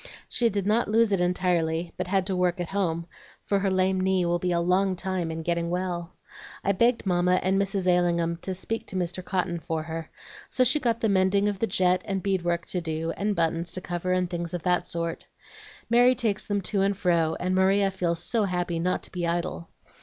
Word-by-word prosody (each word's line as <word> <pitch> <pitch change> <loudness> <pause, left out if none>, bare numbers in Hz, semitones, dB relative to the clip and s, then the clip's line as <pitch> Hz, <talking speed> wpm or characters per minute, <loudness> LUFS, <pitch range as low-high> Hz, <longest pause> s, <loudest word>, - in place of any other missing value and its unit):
She 235 -1 +1
did 200 -2 -2
not 215 +3 +2
lose 225 0 +3
it 195 -3 +2
entirely, 175 -2 0
but 180 - -3
had 190 0 +1
to 190 -1 -2
work 180 -1 +1
at 175 - -3
home, 170 -4 -1 0.4
for 200 - +1
her 195 0 +1
lame 190 0 +2
knee 190 -1 +2
will 175 0 +1
be 180 +1 -1
a 170 - +2
long 185 +2 +2
time 185 -2 -2
in 160 0 -4
getting 170 0 -1
well. 175 -1 -3 0.5
I 200 - +2
begged 235 +4 +2
Mamma 180 0 +2
and 190 +1 +2
Mrs. 195 -1 -2
Ailingham 170 -2 +2
to 185 +2 -5
speak 225 +5 -3
to - - -8
Mr. 180 0 -2
Cotton 180 -2 -1
for 160 -1 -3
her; 160 0 -6 0.4
so 255 - +2
she 270 +5 +4
got 230 -4 0
the 220 - +2
mending 195 +1 +3
of 205 -2 -2
the 225 - +1
jet 180 -2 +2
and 195 -2 -2
bead 195 -2 +1
work 170 0 -1
to 180 - -2
do, 160 0 -2
and 205 0 -1
buttons 165 0 0
to - - -1
cover, 175 0 -3
and 185 0 +1
things 175 0 -4
of 170 - -5
that 180 -1 +1
sort. 170 0 -3 0.6
Mary 245 +2 +5
takes 220 -5 0
them 205 -1 0
to 195 +1 -1
and 195 0 +1
fro, 170 -4 +2
and 185 +1 -1
Maria 195 +1 +3
feels 170 -3 -2
so 225 +2 +1
happy 175 -2 -1
not 180 +2 0
to - - -9
be 175 -2 -2
idle. 170 - -3
180 Hz, 220 wpm, -26 LUFS, 170-195 Hz, 0.6 s, Mary